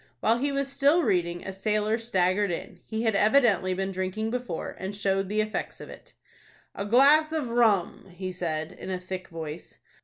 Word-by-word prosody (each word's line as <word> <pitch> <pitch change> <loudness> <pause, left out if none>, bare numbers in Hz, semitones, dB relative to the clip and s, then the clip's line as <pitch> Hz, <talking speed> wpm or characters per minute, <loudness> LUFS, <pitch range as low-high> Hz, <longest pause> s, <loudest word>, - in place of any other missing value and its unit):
While 225 - +2
he 285 +2 0
was 275 0 -1
still 285 +5 +3
reading, 175 - 0
a 190 - -5
sailor 215 +3 0
staggered 195 -2 +1
in. 170 - -5
He 220 0 -3
had 225 -2 +2
evidently 210 -5 +3
been 195 +1 -2
drinking 190 +4 -3
before, 245 -8 -4
and 190 +2 -5
showed 195 -2 0
the 215 +1 +1
effects 215 0 -4
of - - -10
it. - - -14 0.6
"A 200 - -4
glass 285 +7 +5
of 305 -6 -2
rum," 220 -6 +2
he 185 +1 -6
said, 160 -3 -3
in - - -9
a 185 -1 -2
thick 185 0 -6
voice. 160 -1 -8
205 Hz, 185 wpm, -27 LUFS, 185-235 Hz, 0.6 s, glass